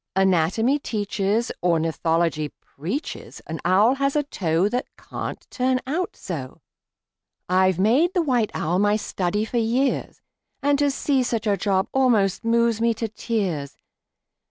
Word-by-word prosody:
Anatomy 190 - +2
teaches, 210 -1 -1
Ornithology 165 -2 +1
preaches 190 - -6
An 160 0 -5
owl 195 +8 +4
has 275 +1 +1
a 295 - +2
toe 175 - 0
That 245 +4 -2
can't - - -6
turn 255 0 +1
out 330 +7 -2
so! 140 -8 -7 0.9
I've 185 0 +3
made 265 - +3
the 350 - +3
white 245 -7 +1
owl 175 +4 0
my 205 +1 +3
study 205 0 -1
for 240 - -3
years, 245 +4 0 0.4
And 285 0 +3
to 290 -1 +3
see 275 -1 +1
such 230 -2 -1
a 205 -2 +3
job 195 0 0
almost 225 -8 +2
moves 230 -1 +2
me 230 0 +2
to 225 +1 -2
tears! 195 - -3
210 Hz, 140 wpm, -23 LUFS, 180-250 Hz, 0.9 s, owl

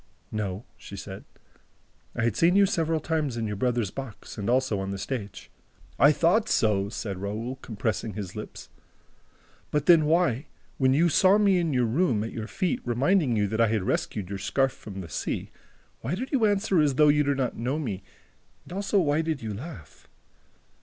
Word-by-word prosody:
"No," 105 0 -3
she - - -10
said, - - -8 0.9
"I 120 - -1
had 115 -3 +1
seen 170 +2 +4
you 200 0 +6
several 165 -3 0
times 155 -5 -1
in 115 - -1
your 105 -1 -3
brother's 120 -2 0
box. 135 -6 -8
And 105 +1 -3
also 125 -5 +2
on 95 0 -3
the 100 - -3
stage." 105 -1 -6 0.5
"I 145 - +7
thought 175 +8 +2
so!" 100 -3 +2
said 100 -4 -5
Raoul, 110 +6 -4
compressing 110 -3 -3
his 100 -4 -6
lips. - - -8 1.0
"But 150 -1 0
then 165 -2 +6
why, 155 -4 +2 0.3
when 130 -1 +4
you 165 +4 +4
saw 185 +5 +5
me 200 -3 +4
in 165 -2 0
your 125 -3 +2
room, 120 - +1
at 115 - -5
your 110 -1 -5
feet, 185 +3 -1
reminding 130 +3 +2
you 105 -1 +2
that 110 +2 0
I 115 - +5
had 105 -2 0
rescued 100 0 -2
your 100 -1 -4
scarf 135 +6 +1
from 100 -6 -9
the 85 - -8
sea, 65 - -3 0.5
why 135 +10 -2
did 255 +7 -5
you 255 -6 +3
answer 200 -4 +2
as 145 -3 +2
though 150 +2 +5
you 150 0 +4
did 140 -1 0
not 130 -3 -1
know 125 +5 -2
me 110 -11 -3 0.6
and - - -11
also 200 +2 0
why 150 -2 +2
did 160 -5 -3
you 110 -2 -3
laugh?" 115 - -10
130 Hz, 195 wpm, -27 LUFS, 110-160 Hz, 1.0 s, I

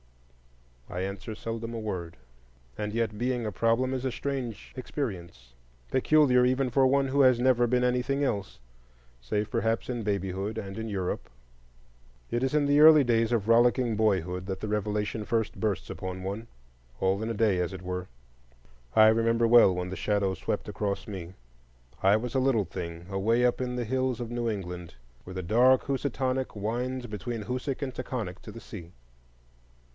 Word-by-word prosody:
I 90 - -4
answer 100 +3 -5
seldom 115 +1 -5
a - - -3
word. 90 -7 -5 0.6
And 105 0 -3
yet, 110 -1 -1
being 125 0 -1
a 105 - -2
problem 115 +6 +1
is 130 -1 -3
a 130 - -1
strange 130 -5 -4
experience,—peculiar 95 - 0
even 130 +1 +2
for 135 +1 +4
one 135 +1 +2
who 140 +2 +3
has 130 -3 +5
never 125 -1 +4
been 125 +1 +2
anything 125 +3 +1
else, 100 - -2 0.6
save 105 - -2
perhaps 115 -1 0
in 120 -2 -2
babyhood 100 +1 -2
and 100 -2 -6
in 110 0 -4
Europe. 95 -3 -3 1.0
It 120 +2 0
is 135 - 0
in 150 -1 +3
the 145 +1 +4
early 155 -2 +9
days 115 -2 +2
of 110 -3 0
rollicking 120 0 +4
boyhood 95 -4 0
that 95 -1 -3
the - - -4
revelation 105 +1 -1
first 110 0 -1
bursts 105 -3 -1
upon 95 0 -5
one, 100 +4 -4 0.5
all 95 +2 +1
in 110 - -2
a - - -1
day, 105 -4 +2
as 90 +1 -1
it 95 -1 -8
were. 90 0 -4 0.9
I 110 - +8
remember 115 +1 +3
well 115 -5 +7
when 90 0 -3
the - - -3
shadow 100 -2 0
swept - - -3
across 100 -1 -3
me. 95 -3 -7 0.7
I 100 +2 +5
was 120 +2 -4
a - - +4
little 130 -6 +2
thing, 85 -1 -6
away 110 +5 +2
up 125 +1 +1
in 125 -1 -2
the 120 -1 -2
hills 130 0 -1
of 120 -1 -5
New 120 -1 -1
England, 90 -5 -5 0.3
where 95 - -8
the 95 - -3
dark 125 +8 +4
Housatonic 130 -1 -1
winds 120 +5 -2
between 110 +1 -5
Hoosac 130 +5 -3
and 130 -2 -4
Taghkanic 115 -9 -4
to - - -9
the 115 - -9
sea. 95 -8 -10
115 Hz, 175 wpm, -28 LUFS, 95-125 Hz, 1.0 s, early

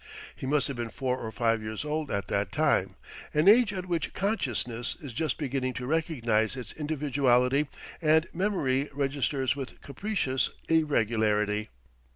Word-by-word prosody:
He 130 - -6
must 145 +1 +2
have 140 - -4
been 120 -1 -3
four 130 +2 -2
or 110 - -5
five 115 -1 +1
years 110 +5 -5
old 150 -1 -2
at 100 -2 -2
that 100 -1 -1
time: - - +2 0.4
an 155 +4 +3
age 220 +1 +7
at 185 -2 -4
which 170 -3 -2
consciousness 125 - -1
is 140 -7 -8
just 155 +1 -1
beginning 130 -3 -1
to 125 - -4
recognize 125 -7 0
its 120 -4 -6
individuality 140 -2 +2 0.3
and 160 0 +4
memory 150 -8 0
registers 135 -2 0
with 135 -2 -7
capricious 140 -5 -1 0.2
irregularity. 110 -9 +2
135 Hz, 150 wpm, -28 LUFS, 120-155 Hz, 0.4 s, age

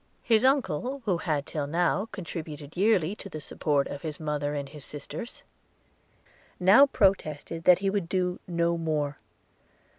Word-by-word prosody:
His 225 -1 +3
uncle, 265 - +1
who 190 -5 +2
had 155 -3 -1
till 145 -2 -3
now 175 +7 +1
contributed 155 -5 -7
yearly 195 -2 +2
to 195 - -9
the 155 - -6
support 145 -1 0
of 140 - -7
his 155 -3 -5
mother 150 -2 -2
and 140 -1 -3
his 145 -1 -10
sisters, 150 - -7 1.2
now 200 +10 +7
protested 165 - 0
that 180 -1 +8
he - - +4
would 195 -4 -2
do 180 -1 0
no 170 -1 0
more. 150 -3 -1
165 Hz, 150 wpm, -28 LUFS, 150-195 Hz, 1.2 s, that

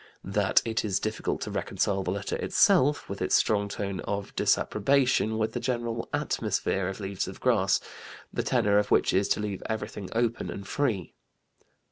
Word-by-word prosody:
That - - +2
it 110 -1 -1
is 100 -4 0
difficult 110 0 -2
to - - -4
reconcile 95 -1 -1
the 95 - -3
letter 95 +1 -2
itself 145 +3 +3
(with - - -6
its - - +2
strong 100 -1 +2
tone 100 -2 -4
of 100 -1 -4
disapprobation) 125 -1 +2
with 110 0 -1
the - - -2
general 120 -2 -2
'atmosphere' 95 -2 -1
of 95 +2 -5
Leaves 100 -1 -3
of 95 - -8
Grass, 105 -6 +3 0.5
the - - 0
tenor 100 0 +3
of 105 - -1
which - - +3
is 95 +1 +2
to - - +2
leave 105 -2 -3
everything 105 -3 -4
open 115 0 0
and 100 0 -7
free. 115 - -1
105 Hz, 170 wpm, -28 LUFS, 100-115 Hz, 0.5 s, itself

